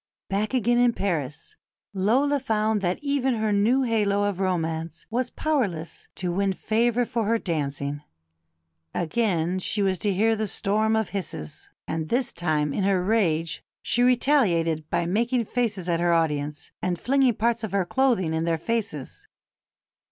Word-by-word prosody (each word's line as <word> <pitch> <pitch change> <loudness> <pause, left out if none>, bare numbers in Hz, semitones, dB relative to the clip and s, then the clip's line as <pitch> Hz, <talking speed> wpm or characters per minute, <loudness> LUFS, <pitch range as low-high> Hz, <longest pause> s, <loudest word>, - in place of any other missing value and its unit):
Back 210 +5 -1
again 240 0 +2
in 245 -1 +4
Paris, 155 -10 -3 0.4
Lola 255 +9 +2
found 220 -4 0
that 180 -1 0
even 275 -3 +1
her 220 -1 0
new 225 +7 +3
halo 205 -4 +1
of 205 -2 -1
romance 165 -3 -2
was 245 +2 0
powerless 200 - -2
to 180 -1 -2
win 195 +2 +1
favour 235 +4 +1
for 230 -1 -2
her 230 +1 +3
dancing. 145 -6 -3 0.9
Again 180 -1 0
she 200 +2 -1
was 190 -2 +1
to 205 - +1
hear 220 +4 +2
the 215 0 -2
storm 215 +3 +1
of 220 -1 0
hisses; 175 - -6 0.2
and 160 -1 -3
this 245 +1 0
time 150 -4 0
in 195 - -1
her 190 -2 +2
rage 170 -6 +1 0.2
"she 240 - +1
retaliated 195 - +2
by 170 - 0
making 235 +6 +1
faces 210 -6 -2
at 170 -1 +1
her 175 0 +2
audience," 150 -3 -1
and 175 -2 -1
flinging 265 -2 +2
parts 230 +1 0
of 220 - -3
her 195 -2 +1
clothing 230 -8 +1
in 160 0 0
their 165 -1 +1
faces. 200 - -4
200 Hz, 160 wpm, -25 LUFS, 170-230 Hz, 0.9 s, in